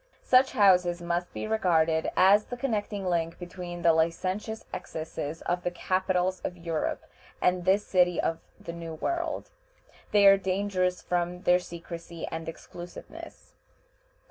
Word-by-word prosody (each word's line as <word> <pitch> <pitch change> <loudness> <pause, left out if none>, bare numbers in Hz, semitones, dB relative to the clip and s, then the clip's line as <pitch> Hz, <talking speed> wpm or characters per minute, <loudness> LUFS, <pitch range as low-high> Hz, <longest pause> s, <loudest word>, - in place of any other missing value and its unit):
Such 260 +1 +4
houses 180 -6 +4
must 175 +1 -2
be - - -5
regarded 165 -7 +2
as 200 +3 +6
the 245 - -6
connecting 210 -6 -2
link 170 -2 0
between 175 -1 -7
the 165 -1 +6
licentious 185 +7 -1
excesses 160 -3 -5
of 175 +1 -1
the 175 - -1
capitals 185 +1 0
of 180 - -5
Europe 165 -2 -2 0.4
and 180 -1 +1
this 195 +2 +3
city 180 -2 +3
of 165 0 0 0.2
the 170 - -7
New 165 -1 -7
World. 340 - -3 0.6
They 205 -1 +5
are 195 0 +9
dangerous 185 -1 -1
from 175 0 -2
their 180 0 +5
secrecy 170 -1 -8
and 165 0 -4
exclusiveness. 175 +2 -10
180 Hz, 140 wpm, -28 LUFS, 170-195 Hz, 0.6 s, are